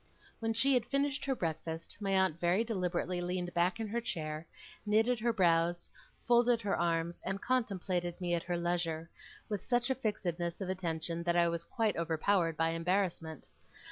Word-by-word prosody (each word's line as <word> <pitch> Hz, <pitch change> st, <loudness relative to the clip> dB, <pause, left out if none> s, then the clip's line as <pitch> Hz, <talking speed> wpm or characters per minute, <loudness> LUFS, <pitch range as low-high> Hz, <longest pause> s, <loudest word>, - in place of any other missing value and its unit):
When 225 Hz, 0 st, 0 dB
she 270 Hz, +5 st, +3 dB
had 245 Hz, -2 st, +2 dB
finished 280 Hz, +1 st, 0 dB
her 270 Hz, -1 st, +1 dB
breakfast, 160 Hz, -3 st, -4 dB
my 200 Hz, -2 st, -2 dB
aunt 190 Hz, -4 st, +2 dB
very 175 Hz, +6 st, +3 dB
deliberately 180 Hz, -4 st, -1 dB
leaned 175 Hz, 0 st, -2 dB
back 175 Hz, +5 st, +1 dB
in 225 Hz, -, -2 dB
her 235 Hz, +3 st, -1 dB
chair, 155 Hz, -5 st, -4 dB, 0.4 s
knitted 220 Hz, +3 st, +3 dB
her 235 Hz, +2 st, +2 dB
brows, 175 Hz, -4 st, +2 dB, 0.4 s
folded 240 Hz, 0 st, +5 dB
her 200 Hz, -, +1 dB
arms, 170 Hz, 0 st, 0 dB
and 195 Hz, +1 st, -2 dB
contemplated 190 Hz, -8 st, -1 dB
me 175 Hz, -1 st, -1 dB
at 170 Hz, -, +1 dB
her 175 Hz, +1 st, -2 dB
leisure, 170 Hz, -2 st, -1 dB, 0.4 s
with 210 Hz, -3 st, -3 dB
such 245 Hz, +1 st, +1 dB
a -, -, +5 dB
fixedness 175 Hz, -8 st, -2 dB
of 190 Hz, -2 st, -4 dB
attention 170 Hz, -2 st, -2 dB
that 170 Hz, 0 st, +1 dB
I 170 Hz, -1 st, +5 dB
was 170 Hz, 0 st, -1 dB
quite 225 Hz, -3 st, 0 dB
overpowered 165 Hz, +1 st, +1 dB
by 165 Hz, 0 st, +2 dB
embarrassment. 165 Hz, -2 st, -1 dB
180 Hz, 170 wpm, -33 LUFS, 170-220 Hz, 0.4 s, folded